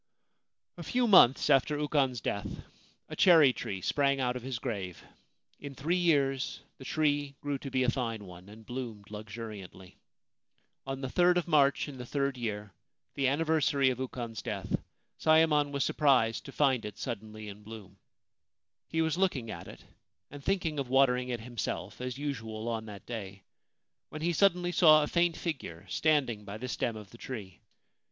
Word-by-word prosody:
A -, -, -7 dB
few 250 Hz, -1 st, +1 dB
months 160 Hz, -, +7 dB
after 145 Hz, +1 st, +3 dB
Ukon's 140 Hz, -5 st, +1 dB
death, 100 Hz, -1 st, -4 dB, 0.4 s
a -, -, -7 dB
cherry 160 Hz, -8 st, +6 dB
tree 95 Hz, -5 st, -5 dB
sprang 140 Hz, +5 st, +1 dB
out 125 Hz, -1 st, 0 dB
of 125 Hz, -, -4 dB
his 130 Hz, 0 st, -4 dB
grave. 100 Hz, -8 st, -5 dB, 0.6 s
In 140 Hz, -1 st, -8 dB
three 160 Hz, +7 st, 0 dB
years 140 Hz, -7 st, +1 dB, 0.2 s
the 130 Hz, -, -10 dB
tree 145 Hz, -2 st, 0 dB
grew 145 Hz, -2 st, -3 dB
to 135 Hz, -, -6 dB
be 130 Hz, -1 st, +1 dB
a 125 Hz, -, +3 dB
fine 115 Hz, -5 st, -3 dB
one 90 Hz, +1 st, -12 dB
and 110 Hz, +1 st, -13 dB
bloomed 115 Hz, -5 st, -7 dB
luxuriantly. 105 Hz, -4 st, -9 dB, 0.9 s
On 135 Hz, 0 st, -4 dB
the 130 Hz, -, -2 dB
jrd 175 Hz, +6 st, +3 dB
of 175 Hz, -, -1 dB
March 145 Hz, -4 st, +3 dB
in 135 Hz, -3 st, -9 dB
the 125 Hz, -, -6 dB
third 140 Hz, 0 st, -1 dB
year, 105 Hz, -5 st, -4 dB, 0.4 s
the 135 Hz, -1 st, +1 dB
anniversary 145 Hz, -2 st, +2 dB
of 125 Hz, -, -5 dB
Ukon's 120 Hz, -3 st, -5 dB
death, -, -, -2 dB, 0.4 s
Sayemon 155 Hz, -2 st, +4 dB
was 140 Hz, -2 st, 0 dB
surprised 125 Hz, -6 st, +2 dB
to -, -, -8 dB
find 135 Hz, -5 st, +2 dB
it 105 Hz, -1 st, -7 dB
suddenly 110 Hz, -1 st, -6 dB
in 105 Hz, 0 st, -9 dB
bloom. 110 Hz, -2 st, -11 dB, 0.9 s
He 160 Hz, 0 st, 0 dB
was 160 Hz, +2 st, -1 dB
looking 135 Hz, -, 0 dB
at 85 Hz, -, -8 dB
it, -, -, -12 dB, 0.5 s
and 145 Hz, 0 st, -10 dB
thinking 175 Hz, -5 st, 0 dB
of 135 Hz, -3 st, -3 dB
water 135 Hz, -1 st, +5 dB
ing 125 Hz, 0 st, -4 dB
it 120 Hz, -2 st, -3 dB
himself, 120 Hz, 0 st, -5 dB
as 125 Hz, 0 st, -4 dB
usual 115 Hz, -6 st, -4 dB
on 110 Hz, -1 st, -3 dB
that 100 Hz, -2 st, -10 dB
day, 100 Hz, -5 st, -7 dB, 0.7 s
when 155 Hz, +1 st, -7 dB
he 170 Hz, +1 st, +1 dB
suddenly 175 Hz, 0 st, +3 dB
saw 155 Hz, -4 st, +6 dB
a -, -, -1 dB
faint 170 Hz, 0 st, +1 dB
figure 100 Hz, -, -5 dB
standing 130 Hz, -, +1 dB
by 100 Hz, +1 st, -7 dB
the 125 Hz, +3 st, -5 dB
stem 120 Hz, -2 st, -2 dB
of 105 Hz, -3 st, -10 dB
the 115 Hz, -, -14 dB
tree. 95 Hz, -, -7 dB
130 Hz, 175 wpm, -30 LUFS, 110-150 Hz, 0.9 s, months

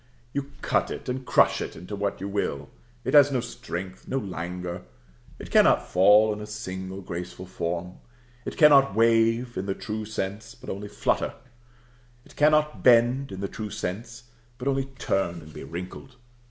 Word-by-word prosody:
You 140 Hz, 0 st, -3 dB
cut -, -, +1 dB
it -, -, -6 dB
and 130 Hz, 0 st, -4 dB
crush -, -, +4 dB
it -, -, -5 dB
into 90 Hz, +5 st, -7 dB
what 100 Hz, 0 st, -2 dB
you 95 Hz, -, -4 dB
will. 100 Hz, -8 st, -3 dB, 0.3 s
It -, -, -2 dB
has 145 Hz, -1 st, +7 dB
no 130 Hz, -, +1 dB
strength, 95 Hz, -4 st, -6 dB
no 135 Hz, -, -1 dB
languor. 90 Hz, -4 st, -4 dB, 0.6 s
It -, -, -10 dB
cannot -, -, +5 dB
fall 105 Hz, +4 st, +6 dB
into 105 Hz, 0 st, -6 dB
a -, -, -13 dB
single 95 Hz, -3 st, -6 dB
graceful 90 Hz, 0 st, -6 dB
form. 90 Hz, 0 st, -4 dB, 0.4 s
It -, -, -6 dB
cannot 140 Hz, -8 st, +6 dB
wave, 115 Hz, +1 st, +3 dB
in 95 Hz, +1 st, -3 dB
the 95 Hz, -, -1 dB
true 110 Hz, -1 st, -4 dB
sense, 110 Hz, +2 st, -5 dB
but 120 Hz, -, -8 dB
only 100 Hz, +2 st, -5 dB
flutter: 105 Hz, 0 st, -1 dB, 0.9 s
it -, -, -18 dB
cannot 150 Hz, 0 st, +3 dB
bend, 125 Hz, +2 st, +4 dB
in 95 Hz, 0 st, -6 dB
the 100 Hz, -, -1 dB
true 105 Hz, +2 st, -6 dB
sense, 115 Hz, +6 st, -5 dB, 0.3 s
but 130 Hz, +1 st, -5 dB
only 135 Hz, -1 st, +1 dB
turn 95 Hz, -10 st, -2 dB
and 75 Hz, 0 st, -13 dB
be -, -, -8 dB
wrinkled. 90 Hz, -, -8 dB
105 Hz, 170 wpm, -26 LUFS, 95-125 Hz, 0.9 s, has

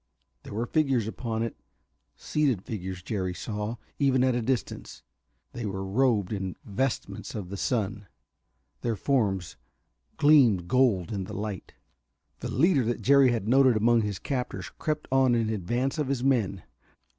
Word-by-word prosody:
There -, -, -10 dB
were 115 Hz, +2 st, -1 dB
figures 135 Hz, -7 st, +1 dB
upon 115 Hz, 0 st, -3 dB
it, 115 Hz, -, -4 dB, 0.6 s
seated 135 Hz, -11 st, 0 dB
figures, 95 Hz, -4 st, -6 dB
Jerry 95 Hz, -4 st, -2 dB
saw, 105 Hz, +3 st, -4 dB, 0.2 s
even 135 Hz, -3 st, +3 dB
at 130 Hz, -1 st, +3 dB
a 120 Hz, -, 0 dB
distance, 125 Hz, -1 st, -3 dB, 0.5 s
that 120 Hz, -3 st, -4 dB
were 95 Hz, -1 st, -4 dB
robed 105 Hz, -2 st, +1 dB
in 95 Hz, -3 st, -3 dB
vestments 120 Hz, +6 st, -3 dB
of 100 Hz, -5 st, -5 dB
the 100 Hz, -, -5 dB
sun. 105 Hz, -2 st, -2 dB, 0.7 s
Their 115 Hz, -2 st, -1 dB
forms 100 Hz, -, 0 dB, 0.6 s
gleamed 125 Hz, -, +5 dB
gold 115 Hz, -7 st, +2 dB
in 100 Hz, -3 st, -3 dB
the 105 Hz, +1 st, -8 dB
light. 105 Hz, -2 st, -5 dB, 0.6 s
The -, -, -5 dB
leader 150 Hz, -1 st, +3 dB
that 120 Hz, +1 st, -2 dB
Jerry 140 Hz, -2 st, +6 dB
had 115 Hz, -4 st, -2 dB
noted 130 Hz, -1 st, +5 dB
among 115 Hz, +2 st, +4 dB
his 105 Hz, -3 st, -2 dB
captors 125 Hz, +4 st, -4 dB
crept 155 Hz, -1 st, -2 dB
on 130 Hz, -2 st, +4 dB
in 115 Hz, -2 st, +1 dB
advance 120 Hz, -, -1 dB
of 150 Hz, -, 0 dB
his 135 Hz, -2 st, -1 dB
men. 110 Hz, -9 st, +1 dB
115 Hz, 155 wpm, -27 LUFS, 100-130 Hz, 0.7 s, Jerry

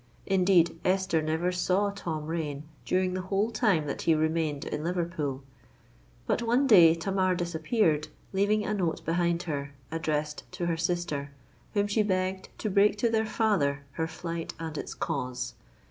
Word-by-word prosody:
Indeed, 180 Hz, -3 st, +3 dB
Esther 185 Hz, -3 st, +2 dB
never 160 Hz, +3 st, 0 dB
saw 185 Hz, +3 st, +1 dB
Tom 160 Hz, -6 st, -4 dB
Rain 150 Hz, -3 st, -3 dB, 0.2 s
during 185 Hz, 0 st, +1 dB
the 185 Hz, -, -2 dB
whole 195 Hz, +4 st, 0 dB
time 210 Hz, -9 st, +2 dB
that 140 Hz, -, -4 dB
he 165 Hz, -, +3 dB
remained 155 Hz, -2 st, 0 dB
in 150 Hz, -, -3 dB
Liverpool. 165 Hz, -6 st, -2 dB, 0.8 s
But -, -, 0 dB
one 240 Hz, +4 st, +2 dB
day 175 Hz, -10 st, +8 dB
Tamar 185 Hz, +1 st, +1 dB
disappeared, 165 Hz, -2 st, +1 dB, 0.3 s
leaving 205 Hz, +2 st, +2 dB
a 210 Hz, -, -1 dB
note 175 Hz, -6 st, -1 dB
behind 170 Hz, +1 st, +1 dB
her, 140 Hz, -3 st, -4 dB, 0.2 s
addressed 150 Hz, -2 st, -2 dB
to 175 Hz, -, -3 dB
her 170 Hz, -1 st, +1 dB
sister, 165 Hz, -4 st, -2 dB, 0.5 s
whom 205 Hz, 0 st, +3 dB
she 205 Hz, +2 st, +1 dB
begged 190 Hz, -1 st, -1 dB
to 215 Hz, -, -2 dB
break 200 Hz, +2 st, +4 dB
to 230 Hz, +3 st, +2 dB
their 220 Hz, -1 st, +1 dB
father 155 Hz, -11 st, +1 dB
her 160 Hz, +3 st, -2 dB
flight 165 Hz, +1 st, -5 dB
and 160 Hz, -2 st, -5 dB
its -, -, -5 dB
cause. 125 Hz, -1 st, -3 dB
170 Hz, 160 wpm, -28 LUFS, 155-195 Hz, 0.8 s, day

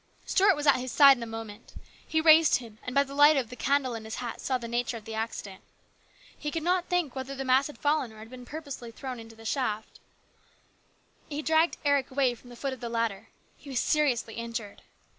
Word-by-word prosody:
Stuart 395 Hz, -1 st, +4 dB
was 295 Hz, -, -4 dB
at 285 Hz, -, +6 dB
his 255 Hz, 0 st, -4 dB
side 280 Hz, 0 st, +8 dB
in 240 Hz, -, -10 dB
a 230 Hz, -, -4 dB
moment. 225 Hz, -1 st, -9 dB, 0.3 s
He 315 Hz, -, +1 dB
raised 315 Hz, 0 st, +7 dB
him, 225 Hz, -3 st, -6 dB
and 250 Hz, -, -6 dB
by. 280 Hz, -, +5 dB
the 275 Hz, 0 st, -10 dB
light 290 Hz, +1 st, +6 dB
of 255 Hz, -4 st, -2 dB
the -, -, -7 dB
candle 275 Hz, -1 st, +1 dB
in 225 Hz, -1 st, -6 dB
his 220 Hz, 0 st, -6 dB
hat 240 Hz, -2 st, -5 dB
saw 260 Hz, -2 st, 0 dB
the 235 Hz, -1 st, -7 dB
nature 240 Hz, 0 st, -2 dB
of 215 Hz, -, -13 dB
the 225 Hz, -, -7 dB
accident. 220 Hz, -3 st, -5 dB, 0.7 s
He 295 Hz, -, -4 dB
could 325 Hz, +1 st, -3 dB
not 360 Hz, +1 st, +1 dB
think 355 Hz, -8 st, -1 dB
whether 265 Hz, +1 st, -5 dB
the 270 Hz, 0 st, -4 dB
mass 260 Hz, +2 st, +4 dB
had 295 Hz, -, -11 dB
fallen 290 Hz, -5 st, 0 dB
or 220 Hz, -, -15 dB
been 250 Hz, +2 st, -11 dB
thrown 315 Hz, +2 st, -7 dB
pur -, -, -19 dB
posely 250 Hz, -1 st, -7 dB
into 225 Hz, 0 st, -12 dB
the 225 Hz, 0 st, -14 dB
shaft. 220 Hz, -4 st, -2 dB, 1.3 s
He 300 Hz, 0 st, -4 dB
dragged 320 Hz, +2 st, +2 dB
Eric 285 Hz, -2 st, +2 dB
away 260 Hz, -2 st, +1 dB
from 245 Hz, +1 st, -15 dB
the 240 Hz, -, -11 dB
foot 270 Hz, +2 st, -3 dB
of 260 Hz, -, -9 dB
the 235 Hz, -, -5 dB
ladder. 230 Hz, -4 st, -2 dB, 0.3 s
He 285 Hz, -, -13 dB
was 260 Hz, -3 st, -1 dB
seriously 265 Hz, -7 st, +1 dB
injured. 230 Hz, -3 st, -6 dB
255 Hz, 230 wpm, -28 LUFS, 230-290 Hz, 1.3 s, side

